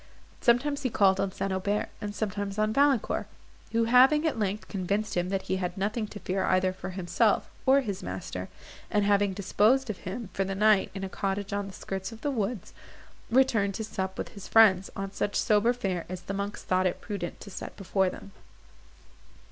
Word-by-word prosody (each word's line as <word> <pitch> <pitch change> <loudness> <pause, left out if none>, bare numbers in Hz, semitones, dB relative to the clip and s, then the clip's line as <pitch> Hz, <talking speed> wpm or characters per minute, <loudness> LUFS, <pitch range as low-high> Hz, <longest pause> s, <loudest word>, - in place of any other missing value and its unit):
Sometimes 275 +4 +2
he 260 - 0
called 195 -3 +3
on 195 -1 0
St. 195 +1 -3
Aubert, 200 +2 -1
and 205 -1 -4
sometimes 205 -1 -3
on 215 0 +1
Valancourt; 275 -3 +2 0.4
who 230 0 +2
having, 260 +7 +5
at 310 -7 0
length, 205 0 -2
convinced 200 +2 -2
him 175 0 0
that 195 0 -1
he 190 - -1
had 180 -1 -3
nothing 215 +3 -1
to 205 - -9
fear 190 0 -1
either 185 0 +2
for 185 - -7
himself, 190 +4 +1 0.2
or 275 +1 +6
his 200 -6 -4
master; - - -5 0.4
and 210 -2 +2
having 200 -1 +3
disposed 215 +6 +2
of 200 - -9
him, 200 +3 -6
for 195 - 0
the 195 0 -3
night, 210 0 +4
in 195 - -5
a - - -2
cottage 195 +1 -3
on 200 -1 -2
the 195 - -9
skirts 190 +1 -5
of 225 0 -11
the 290 - -1
woods, 220 -4 -3 0.6
returned 225 -6 +3
to 220 - -3
sup 190 -3 -4
with - - -4
his 200 -2 -10
friends, 200 -4 +5
on 195 0 -4
such 205 +1 -2
sober 215 +2 +3
fare 195 -8 -3
as 185 -1 -5
the 195 - -5
monks 200 +1 -4
thought 185 0 +2
it 180 - -3
prudent 195 -5 -5
to 200 - -10
set - - -7
before 190 -1 +1
them. 200 - -10
200 Hz, 200 wpm, -28 LUFS, 190-220 Hz, 0.6 s, or